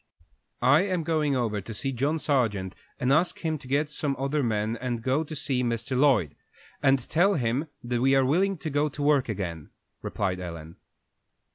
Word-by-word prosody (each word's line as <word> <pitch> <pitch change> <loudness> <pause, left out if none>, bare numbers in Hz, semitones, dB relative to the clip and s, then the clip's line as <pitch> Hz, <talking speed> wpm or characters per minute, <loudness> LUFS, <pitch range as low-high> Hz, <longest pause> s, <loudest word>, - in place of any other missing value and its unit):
"I 145 +5 +6
am 185 -3 -1
going 155 -3 +1
over 110 -5 -1
to 110 +4 -8
see 135 +6 -2
John 140 +5 0
Sargent, 110 - 0 0.3
and 135 0 +2
ask 170 +5 +2
him 160 -2 -2
to 130 - -13
get 145 +3 +1
some 145 -1 -2
other 140 +3 0
men 110 -2 0
and 120 -3 -3
go 135 +5 +1
to 155 0 -7
see 130 -3 0
Mr. 120 +2 -2
Lloyd, 125 - +3 0.5
and 135 -1 +5
tell 190 +6 +3
him 130 +3 0 0.2
we 125 +3 +2
are 135 -1 +4
willing 190 +8 +2
to 155 -1 -5
go 145 +2 +1
to 145 +1 -5
work 145 -4 +3
again," 85 -7 -4 0.3
replied 95 -3 -2
Ellen. 85 -2 -8
135 Hz, 180 wpm, -27 LUFS, 115-150 Hz, 0.5 s, I